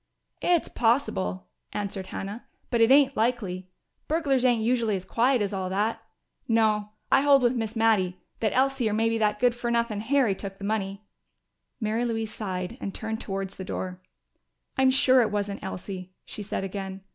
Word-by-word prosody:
"It's 350 Hz, -2 st, +2 dB
possible," 95 Hz, -, 0 dB, 0.3 s
answered 195 Hz, -2 st, -3 dB
Hannah. 200 Hz, +5 st, -6 dB, 0.2 s
"But 235 Hz, -2 st, +2 dB
it 225 Hz, -, +6 dB
ain't 275 Hz, 0 st, +6 dB
likely. 205 Hz, -6 st, -1 dB, 0.4 s
Burglars 290 Hz, -5 st, +1 dB
ain't 240 Hz, -3 st, +3 dB
usually 230 Hz, -3 st, +2 dB
as 185 Hz, -, -5 dB
quiet 245 Hz, 0 st, +2 dB
as 205 Hz, 0 st, -3 dB
all 190 Hz, -1 st, -2 dB
that. 215 Hz, +4 st, 0 dB, 0.5 s
No; 215 Hz, -2 st, +2 dB, 0.2 s
I 270 Hz, -, +6 dB
hold 280 Hz, -2 st, +5 dB
with 240 Hz, 0 st, +4 dB
Miss 225 Hz, -1 st, -3 dB
Mattie 210 Hz, -5 st, +2 dB, 0.2 s
that 215 Hz, -2 st, +1 dB
Elsie 265 Hz, -3 st, +2 dB
or -, -, -1 dB
maybe 225 Hz, +1 st, +1 dB
that 210 Hz, -1 st, +2 dB
good 245 Hz, -1 st, +4 dB
fer 240 Hz, 0 st, -3 dB
nuthin' 235 Hz, -3 st, 0 dB
Harry 255 Hz, -2 st, +2 dB
took 195 Hz, 0 st, -7 dB
the 200 Hz, -, -11 dB
money." 200 Hz, -1 st, -2 dB, 0.8 s
Mary 220 Hz, +1 st, 0 dB
Louise 225 Hz, -2 st, -2 dB
sighed 190 Hz, +2 st, -4 dB
and 195 Hz, -, -4 dB
turned 220 Hz, -1 st, -4 dB
towards 195 Hz, -1 st, -4 dB
the 190 Hz, -, -5 dB
door. 185 Hz, 0 st, -5 dB, 0.7 s
"I'm 265 Hz, 0 st, +4 dB
sure 260 Hz, -1 st, +5 dB
it 225 Hz, -, +2 dB
wasn't 205 Hz, -1 st, -3 dB
Elsie," 185 Hz, -1 st, -6 dB
she -, -, -7 dB
said 200 Hz, -1 st, -3 dB
again. 195 Hz, 0 st, -5 dB
220 Hz, 175 wpm, -27 LUFS, 195-240 Hz, 0.8 s, it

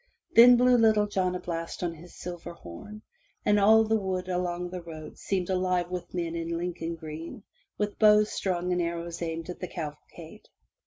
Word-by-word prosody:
Then 245 Hz, +1 st, +9 dB
blew 250 Hz, 0 st, +5 dB
Little 215 Hz, -2 st, +4 dB
John 185 Hz, -3 st, -1 dB
a -, -, -3 dB
blast 165 Hz, 0 st, -5 dB
on 170 Hz, -1 st, -1 dB
his 170 Hz, +2 st, -14 dB
silver 175 Hz, -1 st, -7 dB
horn, 170 Hz, -, -11 dB, 0.4 s
and 210 Hz, 0 st, +4 dB
all 220 Hz, +2 st, +6 dB
the 220 Hz, 0 st, +1 dB
wood 185 Hz, -2 st, -3 dB
along 180 Hz, -1 st, -2 dB
the 180 Hz, -1 st, -5 dB
road 155 Hz, -2 st, -10 dB
seemed 185 Hz, -3 st, -1 dB
alive 185 Hz, -1 st, 0 dB
with 180 Hz, -1 st, -5 dB
men 170 Hz, -2 st, -3 dB
in 165 Hz, 0 st, -3 dB
Lincoln 170 Hz, -1 st, -3 dB
green, 160 Hz, +4 st, -8 dB, 0.3 s
with 210 Hz, -1 st, -2 dB
bows 210 Hz, 0 st, +5 dB
strung 180 Hz, -1 st, -1 dB
and 180 Hz, 0 st, +1 dB
arrows 170 Hz, 0 st, -4 dB
aimed 165 Hz, 0 st, -4 dB
at -, -, -10 dB
the 180 Hz, -, -4 dB
cavalcade. 160 Hz, +3 st, -9 dB
180 Hz, 180 wpm, -28 LUFS, 170-205 Hz, 0.4 s, Then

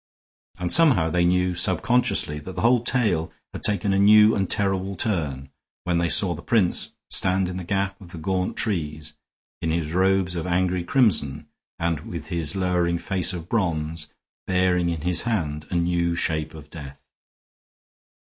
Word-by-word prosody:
And 90 Hz, -1 st, 0 dB
somehow 130 Hz, -, +5 dB
they 85 Hz, +1 st, +2 dB
knew 90 Hz, +1 st, +1 dB
subconsciously 90 Hz, -3 st, +1 dB
that 95 Hz, +5 st, -9 dB
the -, -, -4 dB
whole 120 Hz, +1 st, +4 dB
tale 105 Hz, -9 st, 0 dB, 0.2 s
had -, -, -7 dB
taken 105 Hz, -1 st, +1 dB
a 95 Hz, -, +1 dB
new 105 Hz, +2 st, +6 dB
and 95 Hz, -2 st, -1 dB
terrible 95 Hz, -1 st, -1 dB
turn, 75 Hz, -, -2 dB, 0.3 s
when 90 Hz, -1 st, 0 dB
they 85 Hz, 0 st, 0 dB
saw 90 Hz, -1 st, +4 dB
the 85 Hz, -, -9 dB
prince 105 Hz, -6 st, +2 dB, 0.2 s
stand 95 Hz, 0 st, +2 dB
in 90 Hz, 0 st, -5 dB
the 95 Hz, -, -5 dB
gap 100 Hz, +2 st, -2 dB
of 90 Hz, -2 st, -12 dB
the 90 Hz, -, -9 dB
gaunt 90 Hz, +3 st, -2 dB
trees, 80 Hz, -7 st, -3 dB, 0.5 s
in 80 Hz, -, -2 dB
his 80 Hz, -1 st, -2 dB
robes 95 Hz, 0 st, +1 dB
of 85 Hz, +1 st, -4 dB
angry 90 Hz, 0 st, 0 dB
crimson 80 Hz, -, +1 dB, 0.3 s
and 85 Hz, -2 st, -1 dB
with 80 Hz, 0 st, -8 dB
his 85 Hz, +1 st, -2 dB
lowering 90 Hz, -2 st, 0 dB
face 95 Hz, 0 st, -1 dB
of 85 Hz, -2 st, -7 dB
bronze, 80 Hz, -7 st, -2 dB, 0.4 s
bearing 90 Hz, -2 st, +1 dB
in 85 Hz, -3 st, -3 dB
his 90 Hz, +1 st, +1 dB
hand 75 Hz, -10 st, -3 dB
a -, -, -4 dB
new 85 Hz, 0 st, 0 dB
shape 80 Hz, -2 st, -2 dB
of 75 Hz, -1 st, -13 dB
death. 70 Hz, -4 st, -9 dB
90 Hz, 170 wpm, -23 LUFS, 80-95 Hz, 0.5 s, new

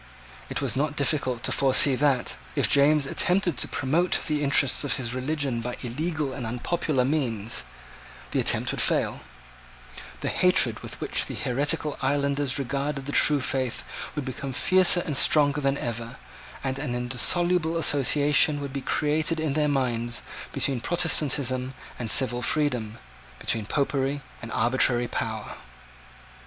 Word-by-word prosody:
It -, -, -4 dB
was -, -, -2 dB
not 145 Hz, +2 st, -1 dB
difficult 135 Hz, -4 st, -1 dB
to -, -, 0 dB
foresee 135 Hz, +2 st, +5 dB
that, 135 Hz, -2 st, +1 dB, 0.2 s
if -, -, +2 dB
James 145 Hz, +1 st, +3 dB
attempted 180 Hz, +3 st, +1 dB
to -, -, +2 dB
promote 165 Hz, +7 st, 0 dB
the 150 Hz, -1 st, -2 dB
interests 140 Hz, -1 st, +3 dB
of 145 Hz, -, -1 dB
his 120 Hz, -2 st, -3 dB
religion 130 Hz, -2 st, -2 dB
by 125 Hz, +1 st, -5 dB
illegal 150 Hz, +3 st, -3 dB
and 130 Hz, -1 st, -6 dB
unpopular 125 Hz, +3 st, -1 dB
means, 120 Hz, -7 st, -2 dB, 0.7 s
the -, -, 0 dB
attempt -, -, +2 dB
would -, -, -2 dB
fail; -, -, +1 dB, 1.0 s
the -, -, -3 dB
hatred -, -, +3 dB
with -, -, -9 dB
which -, -, -1 dB
the -, -, -6 dB
heretical 145 Hz, +3 st, 0 dB
islanders 140 Hz, 0 st, 0 dB
regarded 140 Hz, +1 st, -3 dB
the 145 Hz, -, -5 dB
true 145 Hz, 0 st, +4 dB
faith 130 Hz, -2 st, -2 dB, 0.3 s
would 145 Hz, -3 st, -4 dB
become 135 Hz, +1 st, -6 dB
fiercer 185 Hz, +4 st, +5 dB
and 150 Hz, -, -3 dB
stronger 145 Hz, 0 st, +3 dB
than 135 Hz, 0 st, 0 dB
ever; 115 Hz, 0 st, -5 dB, 0.5 s
and 135 Hz, 0 st, -3 dB
an 130 Hz, -4 st, -4 dB
indissoluble 160 Hz, +7 st, 0 dB
association 145 Hz, 0 st, +4 dB
would 140 Hz, -1 st, -6 dB
be 140 Hz, -, -4 dB
created 155 Hz, +4 st, 0 dB
in 155 Hz, -3 st, -1 dB
their 150 Hz, 0 st, +1 dB
minds 120 Hz, -4 st, -2 dB, 0.3 s
between 130 Hz, -4 st, 0 dB
Protestantism 135 Hz, -5 st, +1 dB, 0.3 s
and 115 Hz, -2 st, -2 dB
civil 125 Hz, +2 st, +4 dB
freedom, 125 Hz, -7 st, -1 dB, 0.4 s
between 110 Hz, -3 st, -3 dB
Popery 140 Hz, 0 st, -1 dB, 0.2 s
and 115 Hz, -, -8 dB
arbitrary 120 Hz, 0 st, +1 dB
power. 110 Hz, -4 st, -5 dB
140 Hz, 145 wpm, -25 LUFS, 125-150 Hz, 1.0 s, foresee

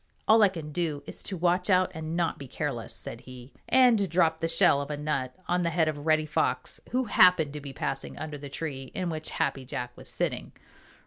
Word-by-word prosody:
"All 220 Hz, +1 st, +6 dB
I 205 Hz, -, +7 dB
can 160 Hz, -5 st, -7 dB
do 155 Hz, -3 st, -2 dB
is -, -, -6 dB
to 190 Hz, -, -5 dB
watch 180 Hz, +3 st, +1 dB
out 185 Hz, -1 st, +4 dB
and 160 Hz, +1 st, -4 dB
not 170 Hz, -2 st, 0 dB
be 140 Hz, -, -8 dB
careless," -, -, -4 dB
said -, -, -6 dB
he, 130 Hz, 0 st, -12 dB, 0.2 s
and 235 Hz, -7 st, +5 dB
dropped 165 Hz, -2 st, +2 dB
the 165 Hz, -, +1 dB
shell 165 Hz, -3 st, +4 dB
of 140 Hz, -, -6 dB
a 150 Hz, -, -3 dB
nut 140 Hz, -4 st, -2 dB
on 180 Hz, 0 st, +1 dB
the 170 Hz, -, +1 dB
head 165 Hz, -1 st, +2 dB
of 150 Hz, 0 st, -3 dB
Reddy 155 Hz, -1 st, +3 dB
Fox, 150 Hz, -, -1 dB
who 255 Hz, +1 st, +1 dB
happened 180 Hz, -, +5 dB
to 150 Hz, -, -6 dB
be 140 Hz, -1 st, -7 dB
passing 135 Hz, 0 st, -4 dB
under 155 Hz, -2 st, -6 dB
the 140 Hz, 0 st, -8 dB
tree 135 Hz, -3 st, -5 dB
in 180 Hz, -2 st, -2 dB
which 155 Hz, -1 st, -3 dB
Happy 135 Hz, -1 st, -1 dB
Jack 125 Hz, -1 st, -5 dB
was -, -, -11 dB
sitting. -, -, -3 dB
160 Hz, 220 wpm, -28 LUFS, 140-180 Hz, 0.2 s, I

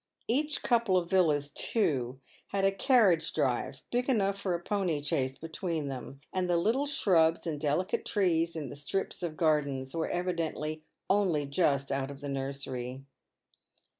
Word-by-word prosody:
Each 295 Hz, +5 st, 0 dB
couple 230 Hz, -6 st, +3 dB
of 170 Hz, -1 st, -1 dB
villas, 150 Hz, -6 st, +3 dB
too, 135 Hz, -, 0 dB, 0.3 s
had 195 Hz, -1 st, 0 dB
a 195 Hz, -, +4 dB
carriage 195 Hz, -, +4 dB
drive, 130 Hz, +1 st, -1 dB
big 245 Hz, +2 st, 0 dB
enough 200 Hz, -6 st, +2 dB
for 195 Hz, -3 st, -1 dB
a -, -, -3 dB
pony 180 Hz, -4 st, -1 dB
chaise 135 Hz, -4 st, -1 dB
between 165 Hz, -2 st, -3 dB
them, 135 Hz, +1 st, -7 dB
and 185 Hz, -1 st, 0 dB
the 175 Hz, -, +3 dB
little 235 Hz, +11 st, +1 dB
shrubs 170 Hz, -, +3 dB
and 150 Hz, -3 st, -3 dB
delicate 155 Hz, +5 st, 0 dB
trees 170 Hz, -4 st, +1 dB
in 150 Hz, -5 st, -4 dB
the -, -, -8 dB
strips 170 Hz, +9 st, -3 dB
of 165 Hz, -3 st, -4 dB
gardens 140 Hz, -5 st, +1 dB
were 165 Hz, -1 st, -1 dB
evidently 165 Hz, -3 st, -2 dB, 0.3 s
only 185 Hz, -7 st, +2 dB
just 140 Hz, -2 st, +1 dB
out 135 Hz, 0 st, -1 dB
of 140 Hz, -1 st, -8 dB
the 145 Hz, 0 st, -5 dB
nursery. 135 Hz, -1 st, -4 dB
165 Hz, 160 wpm, -30 LUFS, 140-190 Hz, 0.3 s, a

